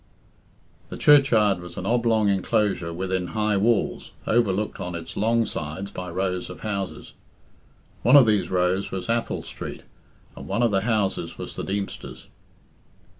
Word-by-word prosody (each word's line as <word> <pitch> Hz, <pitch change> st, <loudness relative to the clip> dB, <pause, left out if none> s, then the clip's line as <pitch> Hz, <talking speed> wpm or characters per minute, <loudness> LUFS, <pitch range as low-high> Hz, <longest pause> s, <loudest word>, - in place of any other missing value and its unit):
The -, -, -6 dB
churchyard 115 Hz, -10 st, +5 dB
was 90 Hz, -1 st, -10 dB
an 90 Hz, -, -4 dB
oblong 115 Hz, -2 st, +2 dB
enclosure 100 Hz, -2 st, +1 dB
within 95 Hz, +1 st, -2 dB
high 105 Hz, -1 st, +2 dB
walls, 110 Hz, +2 st, 0 dB
overlooked 105 Hz, -3 st, +1 dB
on 90 Hz, -1 st, -4 dB
its 85 Hz, -1 st, -7 dB
long 115 Hz, +2 st, +2 dB
sides 80 Hz, +5 st, -5 dB
by 90 Hz, 0 st, -6 dB
rows 90 Hz, +1 st, -2 dB
of -, -, -10 dB
houses. 100 Hz, -3 st, -4 dB, 0.9 s
One 125 Hz, -, +5 dB
of 140 Hz, -4 st, +9 dB
these 105 Hz, -3 st, +2 dB
rows 90 Hz, +2 st, +1 dB
was 95 Hz, +3 st, -5 dB
Athol 115 Hz, 0 st, -1 dB
Street, -, -, -8 dB, 0.5 s
and -, -, -9 dB
one 105 Hz, +5 st, 0 dB
of 115 Hz, -, +3 dB
the 95 Hz, -1 st, +2 dB
houses 100 Hz, -6 st, -1 dB
was -, -, -7 dB
the -, -, -4 dB
Deemster's. 100 Hz, 0 st, -5 dB
100 Hz, 150 wpm, -24 LUFS, 90-110 Hz, 0.9 s, of